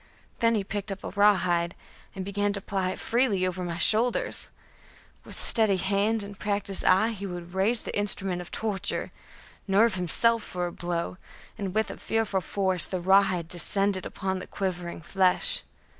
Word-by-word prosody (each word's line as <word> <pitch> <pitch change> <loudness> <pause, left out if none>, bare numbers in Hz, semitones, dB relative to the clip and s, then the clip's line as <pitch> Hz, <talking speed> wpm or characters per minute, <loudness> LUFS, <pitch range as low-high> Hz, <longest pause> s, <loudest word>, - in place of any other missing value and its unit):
Then 230 -1 +3
he 205 - 0
picked 200 +1 -4
up 195 - -7
a - - -4
rawhide, 185 -4 +2 0.4
and 190 -1 -5
began 205 +1 -1
to 200 - -3
ply 190 -2 -2
it - - -4
freely 225 -6 +1
over 185 0 -3
my 170 -1 -4
shoulders. 235 - +2 0.7
With - - -11
steady 215 -4 +4
hand 200 +3 0
and 200 0 -10
practised 200 -2 -1
eye 190 +5 +4
he 200 -3 -5
would 175 -1 -8
raise 210 +5 +3
the - - -5
instrument 195 -3 +3
of 175 - -10
torture, 210 -4 -2 0.6
nerve 205 +3 +4
himself 220 +6 +2
for 180 -3 -4
a 175 - -4
blow, 175 0 -4 0.4
and 195 -3 -5
with 220 0 -1
fearful 220 -4 0
force 185 -1 +1
the 185 - -3
rawhide 190 -2 +3
descended 190 +2 0
upon 190 -1 -3
the - - -9
quivering 180 -4 -4
flesh. 190 - +2
195 Hz, 165 wpm, -27 LUFS, 185-210 Hz, 0.7 s, steady